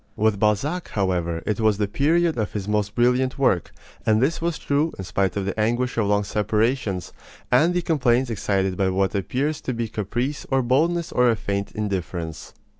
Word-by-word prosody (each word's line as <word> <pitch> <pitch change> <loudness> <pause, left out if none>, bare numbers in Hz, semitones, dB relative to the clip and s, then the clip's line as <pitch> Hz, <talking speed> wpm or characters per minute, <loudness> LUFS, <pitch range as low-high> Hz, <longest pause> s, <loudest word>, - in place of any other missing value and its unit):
With 110 -1 +1
Balzac, 125 - 0
however, 85 -4 -1
it 105 0 -1
was 110 -2 +3
the 105 -1 0
period 160 +9 +2
of 110 -3 -2
his 100 -2 -4
most 105 -1 -1
brilliant 125 +2 +2
work; 125 - +1 0.3
and 110 -1 +3
this 145 +7 +1
was 170 -1 -1
true 145 +3 0
in 95 - -5
spite 95 +1 -1
of 100 - -1
the 100 +2 -3
anguish 120 +3 0
of 110 -3 +1
long 105 0 +2
separations, 105 -2 -1 0.4
and 160 +8 +4
the 180 - +1
complaints 130 -6 +2
excited 95 -3 0
by 95 -1 +2
what 95 +1 0
appears 135 +9 -1
to 130 - -3
be 115 0 -2
caprice 120 +7 -3
or 135 -1 +2
boldness 160 +7 +1
or 125 0 +3
a 115 - +3
faint 100 -2 -3
indifference. 90 -6 -4
110 Hz, 190 wpm, -23 LUFS, 100-130 Hz, 0.4 s, and